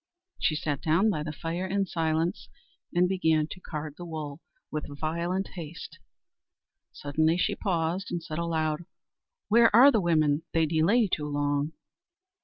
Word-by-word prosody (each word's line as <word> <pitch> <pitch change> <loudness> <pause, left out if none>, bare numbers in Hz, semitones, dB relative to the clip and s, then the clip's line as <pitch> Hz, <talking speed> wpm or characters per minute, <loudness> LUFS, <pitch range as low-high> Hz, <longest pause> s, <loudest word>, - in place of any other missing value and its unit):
She 155 - +1
sat 150 -3 -2
down 175 +8 +3
by 155 - -2
the 155 0 -4
fire 165 +4 -4
in 195 +1 0
silence, 165 +1 -1 0.4
and 180 +1 +3
began 160 -5 +2
to - - -7
card 150 -4 -6
the 175 - -8
wool 155 -2 -6 0.3
with 150 -2 -5
violent 170 +4 -1
haste. 165 -3 -9 0.9
Suddenly 155 +3 +1
she - - +1
paused, 180 -1 -1
and 175 -2 -3
said 160 -2 -5
aloud: 160 -1 -1 0.6
"Where 230 +1 +6
are 265 +5 +9
the 220 - +2
women? 155 -3 +2
they 165 -1 +3
delay 170 +9 +3
too 150 -5 -2
long." 145 +1 -1
165 Hz, 150 wpm, -28 LUFS, 155-180 Hz, 0.9 s, are